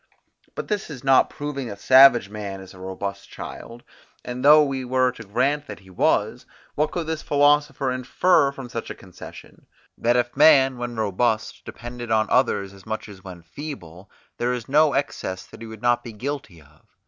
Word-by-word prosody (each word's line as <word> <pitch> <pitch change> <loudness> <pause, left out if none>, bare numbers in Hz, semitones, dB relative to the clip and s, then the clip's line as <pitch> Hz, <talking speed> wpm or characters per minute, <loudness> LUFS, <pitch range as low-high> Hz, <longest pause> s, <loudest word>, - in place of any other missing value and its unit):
But - - -5
this 210 -5 -3
is 135 -5 -9
not 135 -1 +4
proving 145 -3 -5
that 100 -2 -8
savage 130 -3 +6
man 100 -2 -7
is 95 -1 -12
a 95 - -14
robust 95 +1 -6
child; 120 +1 -9 0.4
and 125 +1 -5
though 150 +2 +8
we 135 -2 -3
were 130 0 +1
to 115 -2 -11
grant 135 +8 -1
that - - -9
he 95 -1 -17
was, 90 - 0 0.3
what 150 +1 0
could 170 0 -4
this 160 0 -3
philosopher 145 -1 +2
infer 140 +4 +2
from 135 -2 -9
such 115 -1 -6
a - - -6
concession? 95 -2 -13 0.3
That 120 +1 +2
if 120 0 +1
this 120 - -25
man, 135 -4 +5
when 120 0 -5
robust, 110 +1 -1
depended 120 0 -8
on 110 -1 +2
others 100 0 +1
as 100 +2 -17
much 110 0 -4
as 100 -3 -13
when 90 -3 -10
feeble, 95 - -9 0.3
there 120 +1 0
is 120 -2 -5
no 150 +2 +4
excess 95 -9 -3
that - - -15
he 115 - -7
would 110 0 -11
not 120 0 +2
be 115 - -9
guilty 125 - -6
of. 75 +1 -23
120 Hz, 195 wpm, -23 LUFS, 100-140 Hz, 0.4 s, though